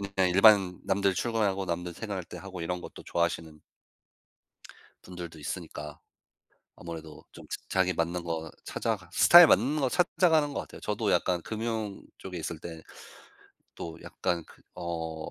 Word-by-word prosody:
그냥 95 -1 +3
일반 95 -1 +6
남들 100 0 +2
출근하고 100 -2 0
남들 90 0 -3
생활할 100 -1 -5
때 - - -10
하고 95 -2 -8
이런 90 +2 -3
것도 - - -10
좋아하시는 85 -2 -2 1.5
분들도 85 -3 -8
있으니까 75 0 -6 0.8
아무래도 80 -2 -9
좀 - - -12 0.2
자기 95 -1 +2
맞는 85 +2 -1
거 80 -1 -3
찾아가 100 -7 -3
스타일 175 - +9
맞는 140 +8 +3
거 135 - +2
찾아가는 160 -2 +3
것 - - -1
같아요. - - -11
저도 - - -1
약간 90 -2 +1
금융 110 -1 -3 0.2
쪽에 90 -2 -7
있을 80 0 -4
때 80 -1 -8 0.9
또 80 -1 -6
약간 85 -2 -2
그 - - -19
어 80 -2 -4
90 Hz, 300 characters per minute, -29 LUFS, 85-105 Hz, 1.5 s, 스타일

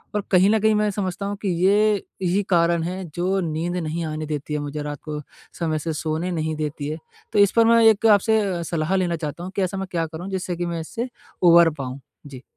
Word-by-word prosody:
और 210 - +1
कहीं 185 +1 +5
न 220 +1 +3
कहीं 220 0 +3
मैं 210 0 +2
समझता 195 -1 -3
हूँ 200 0 -3
कि 200 - -1 0.2
ये 210 +2 +4 0.3
ही 185 +3 +1
कारण 170 -2 +3
है 185 +3 -4
जो 185 +3 0
नींद 170 +3 -2
नहीं 165 0 -3
आने 155 0 -4
देती 150 -1 -4
है 150 - 0
मुझे 145 +1 -4
रात 145 -1 -5
को, 150 -1 -5 0.4
समय 160 -2 0
से 160 +1 -3
सोने 160 +3 -2
नहीं 160 -2 -2
देती 150 -1 -4
है। 155 - -3 0.4
तो - - +3
इस 200 -1 +6
पर 230 - +6
मैं 230 0 +5
एक 220 0 +5
आपसे 200 -4 0
सलाह 165 +2 -1
लेना 180 -3 +1
चाहता 160 +1 -5
हूँ 185 - -6
कि 200 - 0
ऐसा 190 +1 -2
मैं 195 0 -4
क्या 165 -2 0
करूँ 165 +4 -7
जिससे 185 -2 -3
कि 175 - -2
मैं 170 -1 -3
इससे 230 +10 -5 0.3
उभर 170 -1 +7
पाऊँ? 130 0 -5 0.3
जी। 130 -3 -10
175 Hz, 235 wpm, -23 LUFS, 155-195 Hz, 0.4 s, उभर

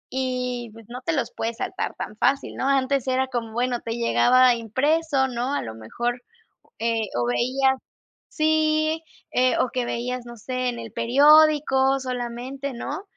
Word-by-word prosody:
y, 250 -2 -2
pues, 225 0 -14
no 250 +2 -7
te 330 - -1
los 255 -5 -1
puedes 230 0 -4
saltar - - -3
tan 210 - -6
fácil, 275 +4 +1
¿no?, 265 - -1
antes 275 -1 +1
era 260 0 +1
como, 240 -3 -4
bueno, 245 +1 -1
te 230 0 -4
llegaba 245 +1 +4
impreso, 270 +5 +1
¿no?, 250 +2 -2
a - - 0
lo 110 -1 -7
mejor, 240 - -4 0.6
eh, 225 -2 0
o 120 - +1
veías, 260 - +2 0.5
sí, 310 0 +1 0.3
eh, 255 0 +3
o 255 - +1
que 250 -1 -1
veías, 245 +1 -3
no 240 0 -10
sé, 255 +3 -3
en 240 -1 -3
el 230 -1 -8
periódico 275 +2 +5
solamente, 255 +2 -5
¿no?, 290 +8 -5
255 Hz, 165 wpm, -24 LUFS, 235-275 Hz, 0.6 s, periódico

